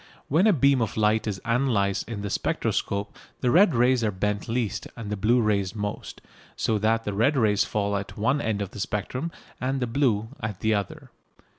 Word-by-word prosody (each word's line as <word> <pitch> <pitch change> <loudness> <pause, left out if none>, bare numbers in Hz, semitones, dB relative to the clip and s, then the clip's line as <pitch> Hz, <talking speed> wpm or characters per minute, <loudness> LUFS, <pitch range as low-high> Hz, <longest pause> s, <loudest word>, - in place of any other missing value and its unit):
When 165 +9 +4
a - - +6
beam 140 -6 +3
of 110 - -2
light 110 +1 +2
is 100 -3 -2
analysed 115 -5 +1
in 110 -3 -4
the 100 - -3
spectroscope 100 +2 -1 0.3
the 125 - +2
red 175 - +5
rays 125 +1 +3
are 110 - +2
bent 105 +1 -2
least 115 -2 -2
and 110 -3 -6
the - - 0
blue 110 +5 +3
rays 100 -3 0
most, 105 -1 -5 0.3
so 110 -2 0
that 115 +2 +1
the 105 - -3
red 120 +8 +2
rays 105 -4 +3
fall 100 -1 -1
at 100 0 -5
one 130 +7 +1
end 105 -4 -1
of 100 - -8
the - - -9
spectrum 125 - -3 0.3
and 135 +2 -1
the 125 - 0
blue 115 -4 +1
at 105 -4 -4
the 110 0 +2
other. 100 -3 -4
110 Hz, 200 wpm, -25 LUFS, 105-125 Hz, 0.3 s, a